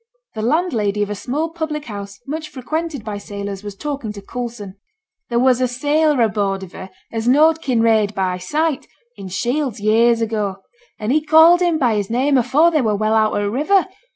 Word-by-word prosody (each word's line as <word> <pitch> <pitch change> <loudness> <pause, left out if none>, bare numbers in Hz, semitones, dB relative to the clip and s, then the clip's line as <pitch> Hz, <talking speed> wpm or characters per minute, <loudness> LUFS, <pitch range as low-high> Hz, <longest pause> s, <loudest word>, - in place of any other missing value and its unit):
The 220 - -5
landlady 225 - 0
of 205 - -4
a - - 0
small 290 +10 -3
public 315 -3 -4
house 200 -2 -8
much 310 +2 -5
frequented 305 0 -4
by 205 -2 -4
sailors 200 -1 -6
was 205 -1 -7
talking 280 -2 -4
to 200 - -9
Coulson. 230 -4 -7 0.5
'There 235 - 0
was 255 0 +3
a 255 - +3
sailor 290 +2 +1
aboard 200 -3 -1
of 185 - -10
her 190 - -9 0.2
as 225 0 -3
knowed 310 +5 +4
Kinraid 225 -5 +2
by 185 -1 -1
sight, 300 - -1 0.3
in 195 -2 -9
Shields, 245 +6 -2
years 230 +3 +3
ago; 215 -4 -2 0.4
and 215 +2 -2
he 305 +3 +3
called 320 +3 +6
him 345 -3 +2
by 245 -6 +2
his 200 -1 -2
name 265 +5 +1
afore 280 +8 +3
they 310 -3 +2
were 215 -4 +1
well 215 +1 0
out 220 -1 +2
o' - - 0
t' - - -1
river. 305 - +2
235 Hz, 195 wpm, -19 LUFS, 205-300 Hz, 0.5 s, called